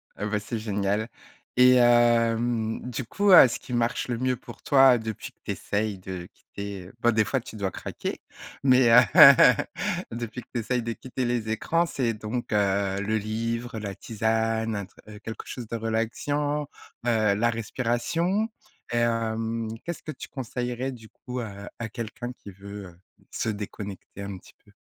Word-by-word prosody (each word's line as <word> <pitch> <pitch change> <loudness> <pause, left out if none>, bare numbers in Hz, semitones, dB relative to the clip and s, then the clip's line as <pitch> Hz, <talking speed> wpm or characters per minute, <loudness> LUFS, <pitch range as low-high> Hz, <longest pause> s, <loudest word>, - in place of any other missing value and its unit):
Ah 105 - -4
bah 105 0 0
c'est 110 +2 -4
génial. 105 0 -1 0.5
Et 125 0 +7
hem 120 -1 +3
du 125 +2 -3
coup, 200 - +1
heu, 155 - +10
ce - - -4
qui 125 - -9
marche 120 +1 0
le 120 -2 -2
mieux 130 +1 0
pour - - -12
toi 135 -3 +6
depuis 110 -2 -6
que - - -49
tu - - -3
essayes 105 -1 -2
de 90 -1 -7
quitter 100 -2 -8
bah 120 - +4
des 110 -1 +3
fois 130 +3 0
tu 110 - -11
dois 100 -3 -2
craquer - - -5 0.4
mais, 130 -3 +5
heu, 125 +1 +9 1.1
depuis 120 +1 -5
que - - -21
tu 120 - -1
essayes 125 +1 -1
de 115 0 -2
quitter 130 +1 -4
les 120 -2 -1
écrans, 165 +10 +1
c'est 125 -7 -1
donc, 110 +2 -4
heu, 100 -1 +1
le 110 +2 0
livre, 115 +2 -3
la 100 -2 -5
tisane, 110 0 -1
un 100 -1 -3
tr - - -25 0.3
quelque 110 - -7
chose 120 -4 -7
de 115 - -4
relaxant, 145 +7 -1 0.4
heu, 110 -3 +3
la 120 +3 +2
respiration 130 - -1 0.5
et - - +1
hem, 115 -1 0 0.2
qu'est-ce 170 -1 -5
que 155 - -5
tu - - -9
conseillerais 125 0 -3
du 115 -3 -12
coup, 125 0 -7
heu, 100 -2 -8
à 115 -2 -4
quelqu'un 120 +2 -6
qui 100 - -12
veut, 100 +1 -9
heu, 85 0 -16 0.3
se - - -2
déconnecter 100 -1 -7
un 100 -1 -6
petit - - -17
peu? - - -21
115 Hz, 175 wpm, -26 LUFS, 105-125 Hz, 1.1 s, heu